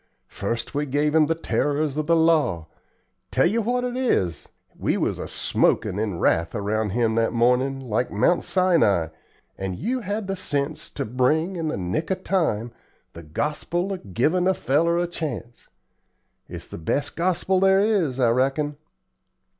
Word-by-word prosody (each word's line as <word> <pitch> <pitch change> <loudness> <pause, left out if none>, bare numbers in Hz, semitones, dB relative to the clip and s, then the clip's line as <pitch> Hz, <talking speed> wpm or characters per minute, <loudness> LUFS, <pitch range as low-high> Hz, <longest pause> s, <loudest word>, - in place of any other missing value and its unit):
First 115 +4 -4
we 145 +1 -1
gave 145 +2 +1
him 155 -2 +4
the 165 - +1
terrors 150 -2 -1
of 155 0 -2
the 170 - +4
law. 155 - +2 0.6
Tell - - +2
yer 220 +7 +2
what 245 +3 0
it 250 0 -2
is, 165 - 0 0.3
we - - 0
was - - -1
a - - -5
smokin' 95 - +1
in 105 -5 -2
wrath 85 0 +1
around 105 +1 -1
him 115 +2 +1
that 115 +1 +1
mornin', 125 +3 +2
like 125 -1 -1
Mount 170 +12 +2
Sinai, 165 - +2 0.5
and 95 -1 -3
you 250 - -2
had 205 -1 -3
the 195 0 -2
sense 150 -3 -3
to 140 - -4
bring, 150 - +1
in 165 -2 -2
the 150 - -2
nick 95 - -2
of 190 -1 -2
time, 120 - 0 0.4
the 85 - -9
gospel 150 - -2
of 100 - -9
givin' 175 +9 +2
a 190 - +3
feller 165 +5 +1
a 175 - +1
chance. 150 -8 -6 0.8
It's - - -8
the - - -8
best 110 - -2
gospel 185 +2 +1
there 190 0 +5
is, 195 - +1
I 120 -2 +4
reckon." 135 +4 0
150 Hz, 170 wpm, -24 LUFS, 115-175 Hz, 0.8 s, there